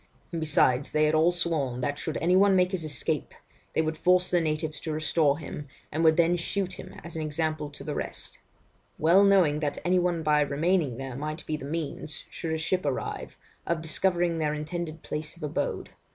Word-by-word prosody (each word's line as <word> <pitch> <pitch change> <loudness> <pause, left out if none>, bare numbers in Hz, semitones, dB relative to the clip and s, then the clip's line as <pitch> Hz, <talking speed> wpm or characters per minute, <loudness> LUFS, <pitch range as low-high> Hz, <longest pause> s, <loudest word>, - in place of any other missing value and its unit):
And 165 -2 -3
besides, 140 -4 +2
they 155 - +3
had 150 - +2
all 160 +2 +4
sworn 155 -8 -1
that 145 +3 -2
should 160 - -3
any 180 +2 +2
one 195 0 +5
make 180 0 +3
his 185 -4 -2
escape, 145 -6 -1 0.4
they 160 - +3
would 155 0 -3
force 180 +1 +3
the 175 -1 +3
natives 155 -1 -2
to 160 - -4
restore 155 -1 +2
him, 150 -2 -7 0.2
and 155 +2 0
would 160 0 +5
then 170 +1 +4
shoot 185 +1 -2
him 185 - -9
as 170 -1 -8
an 160 - -2
example 155 0 -1
to 145 - -9
the - - -3
rest; - - -3 0.6
well 170 +6 +5
knowing, 185 -7 +4
that 145 -2 -2
any 180 +1 +4
one 175 -2 0
by 150 -1 +4
remaining 145 -2 +1
there 135 -2 -5
might 155 +4 -4
be 155 - -2
the 150 - -7
means 155 0 -4
(should 165 - -4
a 160 - 0
ship 180 +4 0
arrive) 140 -3 -3 0.3
of 165 -2 -1
discovering 170 0 +1
their 150 -1 0
intended 160 +1 -5
place 155 +2 -4
of 170 - -11
abode. 150 - -2
160 Hz, 205 wpm, -27 LUFS, 150-175 Hz, 0.6 s, one